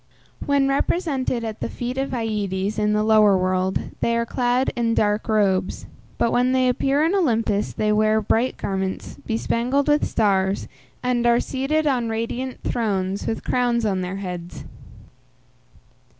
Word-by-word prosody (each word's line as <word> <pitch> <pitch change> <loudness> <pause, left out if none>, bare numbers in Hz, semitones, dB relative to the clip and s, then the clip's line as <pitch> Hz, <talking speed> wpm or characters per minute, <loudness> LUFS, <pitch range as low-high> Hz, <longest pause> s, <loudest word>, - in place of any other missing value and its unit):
When 280 -1 +3
represented 275 -4 0
at 220 -1 -5
the - - -3
feet 245 0 -4
of 270 +1 -2
Aïdes 210 -4 -2
in 210 0 +2
the 210 0 +2
lower 215 -2 +5
world 185 0 -1
they 235 0 +1
are 235 - 0
clad 245 +2 0
in 230 -1 0
dark 210 +2 +1
robes; 195 -4 +1 0.3
but 230 - +1
when 250 +1 +2
they 255 -1 +3
appear 275 +4 +1
in 330 +4 +2
Olympus 230 - +1
they 215 0 0
wear 215 +1 +3
bright 225 +4 0
garments, 190 -1 -4
bespangled 240 +5 0
with 295 0 +3
stars, 195 -2 +1 0.4
and 245 -1 +1
are 235 0 +4
seated 280 +5 -1
on 250 -5 +1
radiant 235 +3 -4
thrones, 200 -4 -1
with 225 - -2
crowns 240 -2 +1
on 190 -3 0
their 180 +1 -4
heads. 180 -3 -6
230 Hz, 150 wpm, -22 LUFS, 205-255 Hz, 0.4 s, lower